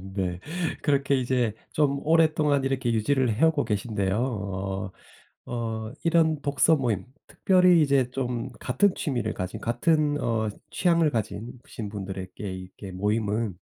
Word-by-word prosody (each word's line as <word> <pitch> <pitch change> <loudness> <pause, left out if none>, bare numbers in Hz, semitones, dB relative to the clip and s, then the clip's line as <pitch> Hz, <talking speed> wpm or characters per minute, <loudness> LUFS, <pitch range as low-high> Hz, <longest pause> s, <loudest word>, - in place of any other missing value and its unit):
네. 90 -2 -2 0.4
그렇게 140 -1 +2
이제 125 -3 +1 0.2
좀 140 -2 +1
오랫동안 155 -3 +3
이렇게 130 -3 0
유지를 125 +1 +1
해오고 155 +3 +3
계신데요. 105 -3 -1
어 100 -5 -3 0.6
어 110 -2 -3
이런 160 -3 +3
독서 145 +3 +3
모임 115 -8 -1 0.2
특별히 180 -3 +4
이제 135 -4 +3
좀 125 -1 -3
같은 180 +10 +2
취미를 120 -6 -2
가진 90 0 -5
같은 145 +5 +1
어 110 -2 0 0.2
취향을 170 -3 +3
가진 115 +1 -4
신 110 -3 -6
분들에게 95 -2 -6 0.2
이렇게 95 +1 -9
모임은 105 0 -1
120 Hz, 280 characters per minute, -26 LUFS, 105-145 Hz, 0.6 s, 특별히